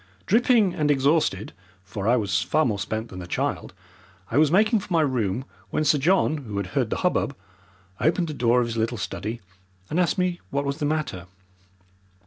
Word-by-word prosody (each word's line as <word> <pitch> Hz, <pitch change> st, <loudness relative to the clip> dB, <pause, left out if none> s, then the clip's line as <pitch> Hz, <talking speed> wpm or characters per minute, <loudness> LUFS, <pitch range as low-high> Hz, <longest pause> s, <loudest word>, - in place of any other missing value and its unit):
Dripping 225 Hz, -3 st, +3 dB
and 150 Hz, -2 st, 0 dB
exhausted 140 Hz, -, +1 dB, 0.3 s
for 100 Hz, +1 st, -5 dB
I 120 Hz, -, +5 dB
was 105 Hz, -5 st, 0 dB
far 155 Hz, 0 st, +1 dB
more 105 Hz, -4 st, -1 dB
spent 110 Hz, +3 st, -3 dB
than 90 Hz, -, -8 dB
the 90 Hz, -, -7 dB
child -, -, -2 dB, 0.6 s
I 120 Hz, -, +1 dB
was 155 Hz, -1 st, +5 dB
making 215 Hz, +5 st, +4 dB
for 185 Hz, -, -11 dB
my 165 Hz, -2 st, +3 dB
room 125 Hz, -4 st, -1 dB, 0.2 s
when 155 Hz, -, 0 dB
Sir 150 Hz, -, +4 dB
John, 160 Hz, 0 st, +2 dB
who 110 Hz, -8 st, -6 dB
had 100 Hz, -, -1 dB
heard -, -, +1 dB
the -, -, -1 dB
hubbub, -, -, +1 dB, 0.6 s
opened 170 Hz, +3 st, +1 dB
the 155 Hz, -, -4 dB
door 125 Hz, -2 st, +3 dB
of -, -, +1 dB
his 115 Hz, -1 st, -4 dB
little 115 Hz, +2 st, -1 dB
study 110 Hz, +3 st, -5 dB, 0.5 s
and 165 Hz, -, +1 dB
asked 175 Hz, -3 st, +1 dB
me 180 Hz, -1 st, 0 dB
what 140 Hz, +1 st, -1 dB
was 140 Hz, +1 st, -2 dB
the 150 Hz, -, -1 dB
matter. 145 Hz, -, -2 dB
140 Hz, 195 wpm, -24 LUFS, 110-160 Hz, 0.6 s, I